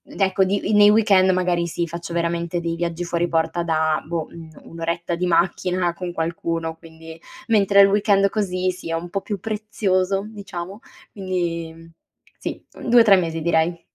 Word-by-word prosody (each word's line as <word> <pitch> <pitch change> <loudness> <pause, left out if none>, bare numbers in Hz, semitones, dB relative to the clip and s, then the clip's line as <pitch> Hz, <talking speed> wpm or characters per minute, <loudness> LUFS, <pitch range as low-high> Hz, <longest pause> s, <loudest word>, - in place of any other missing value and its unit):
ecco 190 -1 +2
di 200 +2 0
mhmm, 210 - +1
nei 205 0 +8
weekend 200 -3 +4
magari 180 -2 +1
si 170 +1 -2
faccio 170 +1 -7
veramente 170 0 -1
dei 170 -1 -3
viaggi 170 0 -3
fuori 175 0 -1
porta 165 +1 0
da, 160 -2 +1
boh, 165 -1 -3
un 165 -1 -11
un'oretta 170 +1 -4
di 180 +1 -2
macchina 175 +1 +1
con 175 0 -6
qualcuno 165 0 -3
quindi 160 0 -13 0.3
mentre 200 -3 +5
il 195 - +7
weekend 200 -1 +3
così, 185 -3 -1
sì, 180 -2 -9
è 165 - -2
un 170 +1 -5
po' 195 - -2
più 205 -3 -5
prezioso, 200 -2 -1
diciamo; 200 -2 -8 0.3
quindi, 175 -4 -3
mhmm, 165 0 -16 0.5
sì, - - -6
mhmm, - - -5
2-3 230 -4 +7
mesi 165 -2 -2
direi. 170 +1 +1
175 Hz, 170 wpm, -22 LUFS, 165-195 Hz, 0.5 s, nei